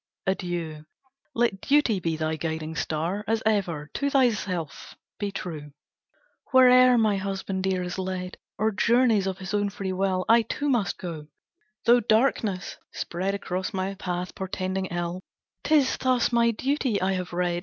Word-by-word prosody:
Adieu! 175 -5 -3 0.5
Let 230 -5 +1
duty 275 -8 +3
be 165 -2 -2
thy 155 0 -1
guiding 160 0 -4
star, 165 +7 -2
As 225 +1 0
ever. 175 -9 0
To 280 - 0
thyself 200 - 0 0.2
be 205 -1 -2
true!" 155 -7 -6 0.8
"Where'er 255 -1 +7
my 215 -3 +3
husband 195 0 -3
dear 185 -1 0
is 180 +1 -4
led, 185 -1 -4 0.2
Or 220 +1 +1
journeys 230 -1 +3
of 190 -1 -2
his 190 0 -6
own 205 -1 +1
free 195 -1 -4
will, 185 -1 0
I 230 +1 +6
too 285 +6 -2
must 230 -8 +1
go, 160 -4 -7 0.6
though 240 +1 +6
darkness 220 -4 +1
spread 190 +3 -3
Across 185 -1 -3
my 190 +1 -1
path, 180 -2 -4
portending 190 0 -3
ill, 175 +1 -3 0.4
'Tis 290 -4 +3
thus 255 -2 +2
my 235 -1 +4
duty 255 -1 0
I 185 +1 +1
have 185 -1 -3
read! 175 0 0
190 Hz, 155 wpm, -26 LUFS, 180-225 Hz, 0.8 s, Where'er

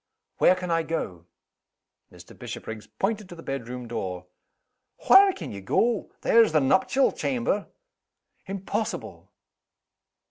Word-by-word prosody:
"Where 185 - +6
can 180 -1 -4
I 165 0 +2
go?" 90 - -4 0.8
Mr. - - -15
Bishopriggs 110 -1 -8
pointed 205 -1 -3
to 175 - -9
the 165 - -12
bedroom 125 -2 -5
door. 95 -6 -4 0.8
"Whar' 390 0 +8
can 165 - -8
ye 100 - -7
go? 225 - 0
There's 230 -7 +4
the 155 - +5
nuptial 190 - +3
chamber!" 235 -6 -1 0.8
"Impossible!" 195 +3 -4
170 Hz, 115 wpm, -26 LUFS, -, 0.8 s, Whar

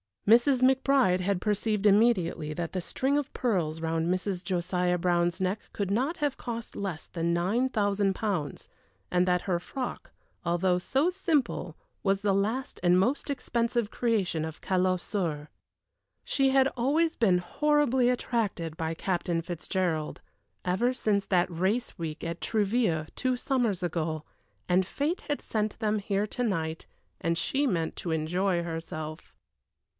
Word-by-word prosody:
Mrs. 245 +4 +5
McBride 260 -7 +4
had 185 0 0
perceived 210 0 0
immediately 195 -7 +3
that 170 +1 -3
the 185 - -1
string 270 +10 0
of 290 -1 -2
pearls 170 -10 0
round 165 0 0
Mrs. 185 +1 -1
Josiah 180 -1 0
Brown's 175 +1 +1
neck 190 +3 0
could 200 -2 -2
not 265 +11 0
have 290 -4 -1
cost 235 -2 -6
less 190 -6 -4
than 170 0 -1
nine 205 +10 +1
thousand 200 -4 +1
pounds, 185 -10 -3 0.4
and 180 0 +3
that 180 -1 +2
her 180 -3 0
frock, 255 +8 -5 0.4
although 180 +1 +2
so 270 - +1
simple, 300 - 0 0.3
was 195 0 +1
the 200 -1 +2
last 220 +7 -1
and 180 0 +4
most 255 +10 0
expensive 235 -4 -1
creation 200 -9 0
of 160 0 -8
Callot 185 -1 +1
Soeurs. 160 -8 -2 0.8
She 270 -1 +2
had 265 0 +4
always 305 +7 +1
been 190 -6 +3
horribly 265 +5 +2
attracted 205 -10 -1
by 160 0 -2
Captain 175 -1 -1
Fitzgerald, 170 -2 -2 0.4
ever 195 +8 +1
since 205 -5 0
that 180 -2 +2
race 195 +10 -1
week 160 -2 -5
at 170 0 -4
Trouville 205 -7 +1
two 255 -1 0
summers 240 -8 0
ago, 160 -2 -2 0.5
and 180 +1 +4
fate 295 - -2
had 290 -1 -3
sent 215 -1 -2
them 215 -1 +1
here 200 0 0
to 245 - -5
night, 165 -7 -2 0.3
and 165 0 0
she 275 +12 +1
meant 165 -7 -1
to 170 - -3
enjoy 170 +3 0
herself. 160 -1 -6
195 Hz, 150 wpm, -28 LUFS, 175-240 Hz, 0.8 s, Mrs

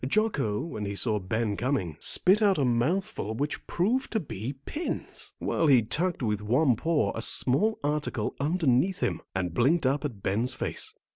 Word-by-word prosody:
Jocko, 140 - +1
when 110 -11 -5
he 100 0 -4
saw 105 0 0
Ben 105 +2 -1
coming, 105 - -1
spit 195 +4 +4
out 200 -3 +4
a 140 - +2
mouthful 125 - 0
which 145 +5 -3
proved 235 +10 0
to 220 - +2
be 125 - -5
pins, 330 +3 -4
while 165 - 0
he 130 -5 +6
tucked 155 +8 -1
with 105 -2 0
one 125 +5 +3
paw 150 -5 +1
a 115 - -4
small 145 - +1
article 145 -6 -1
underneath 160 +3 +1
him, 85 -3 -1
and 90 -3 -1
blinked 140 - +2
up 135 +2 +1
in 145 -4 -2
Ben's 110 +5 -1
face. - - -3
130 Hz, 170 wpm, -28 LUFS, 110-170 Hz, -, he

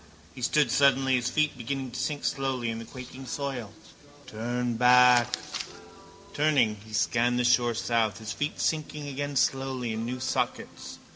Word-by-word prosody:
He - - -10
stood 150 +4 +2
suddenly, 135 -1 +3
his 125 -1 +1
feet 155 +1 +1
beginning 130 +1 -4
to - - -6
sink 145 -2 -2
slowly 130 -4 -1
in 115 - -5
the 115 - -8
quaking 130 +1 -10
soil. 130 -7 -4 0.5
Turn 120 +2 -3
back. 125 0 +5 1.0
Turning, 140 -8 +2
he 110 - -14
scanned 120 +2 +1
the 125 - +1
shore 120 -1 +3
south, 115 -3 0
his 110 0 -6
feet 145 +2 -3
sinking 150 -2 -2
again 145 +1 -4
slowly 130 -3 0
in 110 +1 -3
new 125 +2 -4
sockets. 130 +1 -3
125 Hz, 155 wpm, -27 LUFS, 120-135 Hz, 1.0 s, back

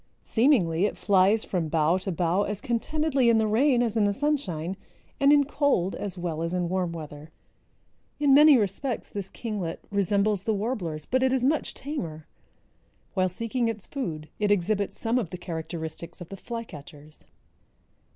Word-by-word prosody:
Seemingly 205 - +3
it - - -6
flies 200 +2 +3
from 175 -4 -1
bough 160 +3 +2
to 190 +1 -4
bough 175 +2 +1
as 205 0 -2
contentedly 275 +2 +1
in 230 - +5
the 220 - +2
rain 245 +3 +3
as 230 -2 -1
in 215 -2 +3
the 205 - +2
sunshine 195 - -1 0.4
and 275 +1 +5
in 290 -1 +6
cold 280 - +1
as 195 -2 -5
well 170 -3 -3
as 165 +2 -2
in 175 -1 -1
warm 185 -2 -1
weather. 155 -2 -8 0.9
In 285 -2 +4
many 295 0 +8
respects 225 +4 -2
this 200 -2 -5
kinglet 205 -8 -4
resembles 200 0 +1
the 220 +2 0
warblers, 190 - -3
but 260 +1 0
it 260 0 +3
is 260 -1 +1
much 295 +4 0
tamer. 170 - -5 0.9
While 185 -1 +1
seeking 230 +5 -2
its 220 -3 -3
food 160 - -5
it 210 -1 +1
exhibits 205 +1 0
some 235 +2 +1
of 205 -9 -3
the 180 - -6
characteristics 165 -1 -5
of 175 - -9
the 195 - -7
flycatchers. 155 -10 -9
200 Hz, 170 wpm, -26 LUFS, 170-240 Hz, 0.9 s, many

